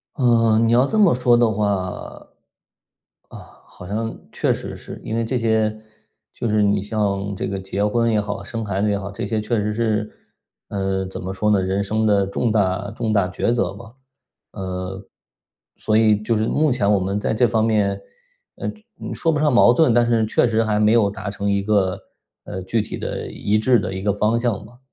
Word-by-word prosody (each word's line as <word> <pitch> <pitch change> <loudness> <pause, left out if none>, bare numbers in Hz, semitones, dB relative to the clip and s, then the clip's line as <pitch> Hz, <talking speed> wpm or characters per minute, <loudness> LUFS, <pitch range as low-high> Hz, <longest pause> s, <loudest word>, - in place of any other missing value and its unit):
呃， 115 -3 +3
你 115 0 +2
要 125 +2 +5
这 215 +9 0
么 200 -5 +6
说 125 -1 +3
的 120 -1 +4
话， 105 0 0 1.6
啊， - - -11 0.3
好 - - -13
像 110 +3 -3
确 - - 0
实 - - -7
是。 - - -10
因 110 - -3
为 115 - 0
这 115 +3 -2
些 110 -2 +1 0.6
就 120 - -3
是 105 0 +2
你 100 0 +2
像 100 -1 -2
这 95 - -4
个 100 -1 -3
结 95 +1 -2
婚 115 +2 +1
也 110 -2 +2
好， 100 -1 -4
生 115 +2 -5
孩 100 -2 -2
子 105 - +1
也 100 - +1
好， 100 0 -5
这 100 - -5
些 110 +1 -1
确 110 +2 -1
实 105 +1 -2
是， 110 -2 -1 0.6
呃， 95 -1 -2
怎 95 - -7
么 95 +1 -5
说 105 +2 0
呢？ 105 -2 +3
人 95 +2 -1
生 110 +2 0
的 100 -2 +3
重 105 +4 -1
大 100 -1 0
重 110 -1 -2
大 100 -4 +2
抉 95 +5 -1
择 105 -7 0
吧。 110 +3 -13 0.6
呃， 95 0 -5 0.7
所 110 - 0
以 110 -1 +4
就 115 +1 0
是 110 +1 0
目 155 +4 +2
前 110 -5 +1
我 100 - +3
们 100 +2 -1
在 105 - -1
这 120 +2 +3
方 110 -1 +1
面， 100 -3 +1 0.5
呃， - - -5
就 215 - -8 0.3
说 165 - 0
不 150 - 0
上 150 -2 +3
矛 120 0 +6
盾， 130 -2 +4
但 120 0 +3
是 115 -2 +2
确 110 - +2
实 115 -1 +1
还 110 -2 0
没 105 0 +4
有 110 -4 +3
达 100 0 -6
成 100 0 -2
一 100 0 0
个 100 -3 +1 0.5
呃， 95 - -6
具 110 +5 0
体 105 - -5
的、 - - -5
一 105 +1 0
致 120 +1 +3
的 95 - -4
一 95 - -4
个 100 0 +1
方 105 +3 +1
向 115 -4 -1
吧。 120 +3 -16
105 Hz, 230 characters per minute, -21 LUFS, 100-115 Hz, 1.6 s, 么